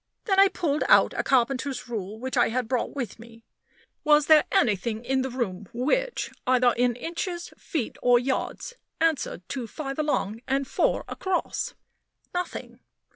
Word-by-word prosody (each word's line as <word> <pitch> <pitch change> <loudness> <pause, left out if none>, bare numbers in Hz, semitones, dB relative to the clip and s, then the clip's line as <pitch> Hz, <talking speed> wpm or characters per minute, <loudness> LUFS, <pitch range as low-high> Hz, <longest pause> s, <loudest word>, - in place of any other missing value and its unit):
Then 390 -3 +3
I 395 - +8
pulled 315 -6 -1
out - - +6
a - - 0
carpenter's 265 +1 0
rule 215 -3 -5
which 260 +3 -4
I - - +4
had 245 0 -1
brought 250 +3 -1
with 245 -6 -4
me. 230 0 -14 0.6
Was 300 -1 +5
there 310 -1 +6
anything 220 +2 +1
in 265 +1 +1
the 265 - -2
room 210 -7 -4
which 485 - 0 0.2
either 250 -1 +4
in 245 0 +2
inches, 345 +5 -4
feet, 290 - -4
or 245 0 +5
yards 265 - -2 0.3
answered 315 - 0
to 255 -4 -4
"5 275 +4 -5
along" 230 -8 -1
and 270 0 0
"4 - - +1
across"? 375 -1 -2 0.6
Nothing. 360 0 -4
260 Hz, 155 wpm, -26 LUFS, 235-305 Hz, 0.6 s, I